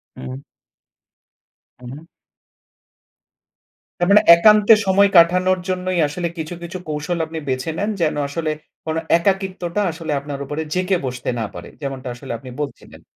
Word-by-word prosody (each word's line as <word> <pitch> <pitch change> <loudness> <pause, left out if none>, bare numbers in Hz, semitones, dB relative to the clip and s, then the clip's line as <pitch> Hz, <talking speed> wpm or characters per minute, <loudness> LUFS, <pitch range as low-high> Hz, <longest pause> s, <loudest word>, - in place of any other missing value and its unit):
উম 65 +1 -8 1.4
উ - - -12
হু। 150 +4 -10 2.0
তার 175 - +1
মানে 210 - +7
একান্তে 210 +4 +6
সময় 195 +1 +4
কাটানোর 180 +2 +4
জন্যই 185 -1 -1
আসলে 170 +4 -3
কিছু, 160 +1 -5
কিছু 170 +2 -6
কৌশল 150 +3 -2
আপনি 160 0 -6
বেছে 130 +4 -2
নেন। 205 +4 -1
যেন 155 -2 +1
আসলে 155 +2 -2 0.3
কোনো 160 0 -1 0.2
একাকিত্বটা 190 0 -1
আসলে 160 -1 -6
আপনার 140 0 -7
উপরে 150 +3 -4
জেঁকে 185 0 +1
বসতে 125 -1 -4
না 110 - -1
পারে। - - -9
যেমনটা 135 -2 -5
আসলে 135 +2 -9
আপনি 130 +3 -11
বলছিলেন। 145 - -8
165 Hz, 140 wpm, -20 LUFS, 145-185 Hz, 2.0 s, মানে